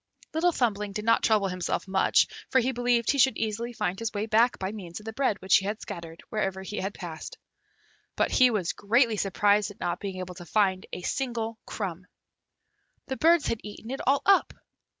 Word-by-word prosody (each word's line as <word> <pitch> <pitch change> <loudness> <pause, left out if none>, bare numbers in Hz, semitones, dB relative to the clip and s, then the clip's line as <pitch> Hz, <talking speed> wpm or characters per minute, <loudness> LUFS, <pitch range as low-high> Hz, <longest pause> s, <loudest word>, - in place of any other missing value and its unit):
Little 340 +3 +3
Thumbling 210 -8 -1
did 210 +1 -4
not 230 0 +4
trouble 215 -3 +3
himself 180 +1 -2
much, 190 0 +3 0.2
for 260 - +4
he 255 +1 +1
believed 245 -2 +2
he 280 - -1
should 265 +1 +4
easily 225 +2 -2
find 190 -5 -2
his 230 -1 -2
way 205 0 -2
back 225 +3 +3
by 190 +1 -3
means 185 -5 -7
of 210 - -15
the 225 - -5
bread 260 -5 0
which 190 - +6
he 195 - -3
had 210 +2 -2
scattered 165 -1 -8
wherever 195 -3 -2
he 205 +2 -6
had 195 +2 -3
passed; 160 -3 -7 0.8
but - - +1
he 255 -1 +6
was 205 -7 -1
greatly 230 +2 +2
surprised 205 +1 +2
at 205 - -13
not 175 - -2
being 195 -2 -5
able 185 0 -5
to 175 -1 -10
find 190 -2 +1
a 180 - -6
single 230 -3 -2
crumb. 185 -3 -5 1.0
The 265 - -2
birds 330 -1 +4
had 230 - -1
eaten 210 +3 -8
it 270 - -4
all 275 +1 +3
up! 395 0 +4
210 Hz, 205 wpm, -27 LUFS, 190-240 Hz, 1.0 s, which